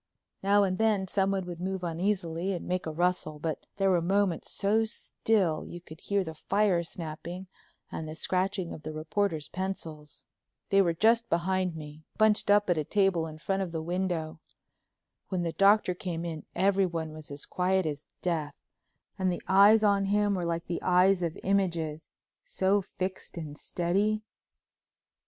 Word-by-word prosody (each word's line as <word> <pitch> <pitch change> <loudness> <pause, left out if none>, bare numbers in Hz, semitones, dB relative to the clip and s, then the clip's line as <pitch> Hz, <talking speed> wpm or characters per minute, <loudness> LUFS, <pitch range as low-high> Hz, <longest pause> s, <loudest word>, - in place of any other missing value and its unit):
Now 200 +1 +4
and 185 0 0
then 215 -4 +2
someone 195 0 +1
would 175 -1 -7
move 190 0 -3
uneasily 175 +1 -1
and 175 - -5
make 180 -1 -1
a - - -2
rustle, 170 -2 0
but 155 0 -4
there 195 -1 +3
were 175 -2 +3
moments 190 0 +1
so 210 +3 +2
still 205 -6 0
you 175 - -8
could 160 -2 -13
hear 200 -1 0
the 160 -2 -6
fire 195 +2 +1
snapping 170 +2 -6 0.5
and 155 -1 -5
the 155 - -6
scratching 185 +1 -1
of - - -9
the 155 +1 -6
reporters' 155 0 -1
pencils. 165 -6 -6 0.5
They 195 0 +6
were 170 -3 +1
just 230 +5 +3
behind 180 +1 0
me, 150 -1 -9 0.2
bunched 215 -1 +3
up 205 0 +5
at 175 -3 +2
a - - 0
table 190 -2 +2
in 155 -1 -9
front 195 +4 -1
of 185 -3 -3
the 165 - -3
window. 175 -2 -2 0.9
When 185 -2 -1
the 165 -1 -2
Doctor 200 -1 +4
came 175 -2 -4
in 160 -3 -6
everyone 185 -5 +1
was 155 -1 -10
as 140 0 -6
quiet 185 0 +1
as 150 -1 -4 0.2
death 155 -5 -2 0.6
and 185 -1 +2
the 175 - -4
eyes 205 +3 +6
on 200 -1 +3
him 205 +1 +2
were 180 -3 -1
like 170 0 -2
the 170 - -3
eyes 180 +1 +4
of 170 -2 -2
images, 170 -5 0 0.3
so 200 - +1
fixed 190 -1 -6
and 155 -3 -6
steady. 200 +7 0
180 Hz, 170 wpm, -29 LUFS, 165-195 Hz, 0.9 s, They